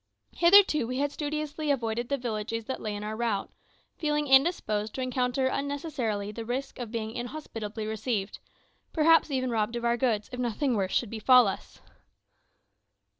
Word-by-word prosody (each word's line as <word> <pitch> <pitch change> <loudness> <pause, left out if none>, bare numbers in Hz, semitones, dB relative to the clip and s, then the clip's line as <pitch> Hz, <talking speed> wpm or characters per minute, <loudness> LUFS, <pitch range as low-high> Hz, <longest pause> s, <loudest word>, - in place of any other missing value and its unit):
Hitherto 340 - +6
we 255 +1 -3
had 285 +1 0
studiously 300 0 -3
avoided 240 -3 -1
the 280 - +1
villages 230 -2 -3
that 260 - -4
lay 210 -1 -3
in 205 - -6
our 215 +1 -4
route, 220 -3 -2 0.5
feeling 300 -2 0
indisposed 265 -7 +2
to 265 - -3
encounter 255 0 0
unnecessarily 260 -7 -2
the 230 +2 -6
risk 255 +4 -4
of 240 -3 -5
being 220 -1 -4
inhospitably 230 -4 -6
received 215 -2 -3 0.5
perhaps 325 +1 +5
even 255 -2 -1
robbed 225 +1 0
of 235 0 -3
our 235 0 +2
goods, 230 -5 0
if 250 - -6
nothing 250 +3 0
worse 190 -2 -1
should 235 - 0
befall 240 +1 +5
us. 195 - -6
245 Hz, 160 wpm, -28 LUFS, 220-280 Hz, 0.5 s, Hitherto